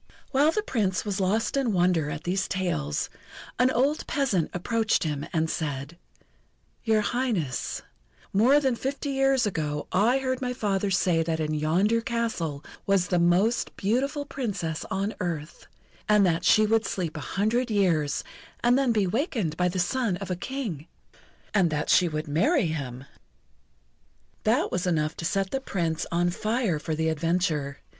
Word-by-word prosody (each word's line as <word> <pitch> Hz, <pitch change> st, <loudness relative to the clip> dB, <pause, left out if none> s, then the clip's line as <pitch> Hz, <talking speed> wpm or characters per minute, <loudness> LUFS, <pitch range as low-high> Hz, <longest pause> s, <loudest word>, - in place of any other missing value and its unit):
While 285 Hz, +3 st, +4 dB
the 425 Hz, +4 st, -1 dB
Prince 195 Hz, -, -1 dB
was 200 Hz, -1 st, -2 dB
lost 200 Hz, +7 st, +1 dB
in 265 Hz, -6 st, +1 dB
wonder 175 Hz, -4 st, +2 dB
at 150 Hz, +1 st, -5 dB
these 190 Hz, +2 st, 0 dB
tales, 75 Hz, -, -1 dB, 0.5 s
an 250 Hz, +1 st, +5 dB
old 270 Hz, +4 st, +1 dB
peasant 255 Hz, -, +1 dB
approached 225 Hz, +5 st, 0 dB
him, 150 Hz, -3 st, -3 dB
and 160 Hz, 0 st, +1 dB
said: 145 Hz, -1 st, -3 dB, 0.9 s
"Your 220 Hz, -2 st, +3 dB
Highness, 210 Hz, -, -1 dB, 0.5 s
more 245 Hz, +9 st, +5 dB
than 265 Hz, -4 st, +1 dB
fifty 280 Hz, +3 st, -3 dB
years 270 Hz, -2 st, +3 dB
ago 150 Hz, -6 st, -2 dB
I 225 Hz, +7 st, +3 dB
heard 260 Hz, -1 st, -2 dB
my 250 Hz, -1 st, -1 dB
father 205 Hz, -4 st, 0 dB
say 180 Hz, -3 st, +2 dB
that 160 Hz, 0 st, -1 dB
in 155 Hz, -1 st, -1 dB
yonder 180 Hz, +10 st, +2 dB
castle 225 Hz, -11 st, -2 dB, 0.2 s
was 195 Hz, -2 st, +2 dB
the 180 Hz, -, +2 dB
most 185 Hz, +7 st, +2 dB
beautiful 275 Hz, +8 st, 0 dB
Princess 200 Hz, -, -3 dB
on 195 Hz, +2 st, -1 dB
earth, 165 Hz, -4 st, -4 dB, 0.4 s
and 210 Hz, -1 st, +5 dB
that 165 Hz, -2 st, +1 dB
she 215 Hz, -, +6 dB
would 225 Hz, +1 st, +2 dB
sleep 170 Hz, -5 st, -3 dB
a -, -, -4 dB, 0.2 s
hundred 235 Hz, +5 st, +1 dB
years 170 Hz, -9 st, +1 dB, 0.4 s
and 245 Hz, +2 st, +4 dB
then 265 Hz, -3 st, +2 dB
be 210 Hz, -3 st, +2 dB
wakened 215 Hz, -, -1 dB
by 180 Hz, +2 st, +1 dB
the 180 Hz, +1 st, -2 dB
son 205 Hz, +1 st, 0 dB
of 195 Hz, -1 st, -6 dB
a -, -, 0 dB
King, 190 Hz, -, -5 dB, 0.7 s
and 190 Hz, -5 st, +4 dB
that 150 Hz, -1 st, -1 dB
she 180 Hz, -, +5 dB
would 155 Hz, -1 st, -3 dB
marry 215 Hz, -, +2 dB
him." 135 Hz, -5 st, -4 dB, 1.4 s
That -, -, +2 dB
was 180 Hz, 0 st, -1 dB
enough 155 Hz, -3 st, 0 dB
to 165 Hz, -, -4 dB
set 195 Hz, +2 st, 0 dB
the 270 Hz, -, -1 dB
Prince 165 Hz, -9 st, -2 dB
on 175 Hz, +1 st, +2 dB
fire 215 Hz, -3 st, 0 dB
for 155 Hz, +1 st, -3 dB
the 160 Hz, +1 st, 0 dB
adventure. 160 Hz, -3 st, -1 dB
190 Hz, 165 wpm, -26 LUFS, 160-235 Hz, 1.4 s, she